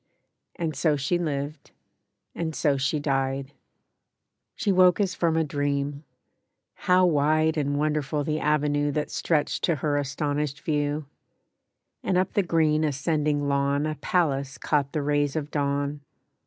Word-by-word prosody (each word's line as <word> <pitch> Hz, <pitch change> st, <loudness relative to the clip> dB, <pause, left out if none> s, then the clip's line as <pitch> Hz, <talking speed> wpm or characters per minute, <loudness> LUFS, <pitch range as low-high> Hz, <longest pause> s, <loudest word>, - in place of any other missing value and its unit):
And 160 Hz, -3 st, -3 dB
so 155 Hz, -3 st, +2 dB
she 145 Hz, +5 st, 0 dB
lived, 150 Hz, -2 st, -4 dB, 0.6 s
and 160 Hz, -2 st, -3 dB
so 145 Hz, -2 st, +2 dB
she 140 Hz, +3 st, 0 dB
died. 135 Hz, -1 st, -1 dB, 1.0 s
She 205 Hz, -, 0 dB
woke 185 Hz, 0 st, +5 dB
as 195 Hz, -2 st, +1 dB
from 165 Hz, -3 st, +1 dB
a 160 Hz, -, +3 dB
dream. 145 Hz, 0 st, -2 dB, 0.7 s
How 185 Hz, 0 st, +3 dB
wide 155 Hz, 0 st, +2 dB
And 145 Hz, -2 st, 0 dB
wonderful 150 Hz, -1 st, 0 dB
the 155 Hz, +1 st, -1 dB
avenue 145 Hz, -1 st, +1 dB
That 150 Hz, 0 st, -2 dB
stretched 155 Hz, -3 st, 0 dB
to 170 Hz, -, +1 dB
her 145 Hz, +1 st, 0 dB
astonished 145 Hz, 0 st, -2 dB
view! 145 Hz, -1 st, -1 dB, 1.0 s
And 185 Hz, -1 st, 0 dB
up 185 Hz, +1 st, 0 dB
the 205 Hz, -, +3 dB
green 160 Hz, -3 st, +2 dB
ascending 150 Hz, 0 st, 0 dB
lawn 140 Hz, +1 st, +1 dB
A 155 Hz, -, -1 dB
palace 140 Hz, -3 st, 0 dB
caught 140 Hz, -2 st, 0 dB
the 150 Hz, -3 st, -2 dB
rays 145 Hz, 0 st, +1 dB
of 150 Hz, -2 st, -3 dB
dawn. 145 Hz, 0 st, -1 dB
150 Hz, 140 wpm, -26 LUFS, 140-155 Hz, 1.0 s, woke